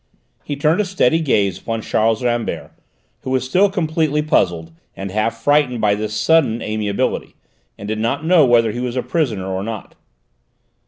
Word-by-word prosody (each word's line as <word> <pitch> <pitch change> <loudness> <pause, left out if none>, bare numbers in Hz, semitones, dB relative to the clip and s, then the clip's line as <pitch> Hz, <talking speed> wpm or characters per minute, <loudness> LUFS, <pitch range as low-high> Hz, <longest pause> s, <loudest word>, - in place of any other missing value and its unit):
He 145 - -4
turned 155 +7 +2
a - - -1
steady 165 -5 +2
gaze 100 - +1
upon 115 +1 -4
Charles 110 +2 +1
Rambert, 120 -1 -2 0.5
who - - -7
was 130 -1 +1
still 190 +9 +3
completely 160 -5 0
puzzled, 85 - 0 0.2
and 95 0 -6
half 110 +3 -2
frightened 145 -4 +2
by 105 -2 +2
this 105 +1 -3
sudden 135 -4 +2
amiability, 105 -2 -2 0.4
and 100 - -8
did 110 0 -2
not 130 +7 -1
know 170 -2 +5
whether 120 -3 +4
he 120 - -5
was 125 0 -3
a 125 - -1
prisoner 120 - -1
or 95 0 -3
not. 110 -1 -6
120 Hz, 170 wpm, -19 LUFS, 110-150 Hz, 0.5 s, know